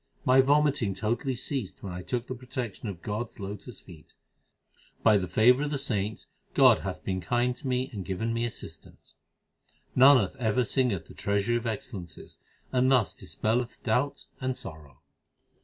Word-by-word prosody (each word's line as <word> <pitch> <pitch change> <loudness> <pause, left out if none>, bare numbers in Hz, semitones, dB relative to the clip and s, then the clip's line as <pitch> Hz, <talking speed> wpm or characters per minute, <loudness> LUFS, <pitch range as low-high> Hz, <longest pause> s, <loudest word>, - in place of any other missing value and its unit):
My 130 +1 +6
vomiting 140 -7 +2
totally 120 +4 -1
ceased 130 -4 -4
when 95 -3 -5
I 90 - -5
took 120 +5 -3
the 130 - -5
protection 120 -3 -5
of 90 -4 -8
God 110 +3 -2
s 115 - -21
lotus 100 +3 -7
feet. 85 -5 -15 0.9
By 110 -2 +6
the 95 -2 -2
favour 120 +9 +5
of 150 - -1
the 145 - -1
saints, 110 -6 -2 0.3
God - - +7
hath - - -5
been 95 -1 -2
kind 120 +6 +1
to 145 - -7
me 130 0 0
and 100 -3 -4
given 105 +5 -2
me 115 0 -1
assistance. 120 - -8 0.8
Nanak 130 +1 +6
ever 120 +1 +1
singeth 110 -9 0
the - - -14
Treasury 100 +4 0
of 120 0 -4
excellences, 100 - -6 0.3
and 130 0 +3
thus 125 -6 +3
dispelleth 120 +2 -2
doubt 125 +5 0 0.2
and 130 0 -1
sorrow. 75 -5 -11
115 Hz, 165 wpm, -28 LUFS, 100-130 Hz, 0.9 s, God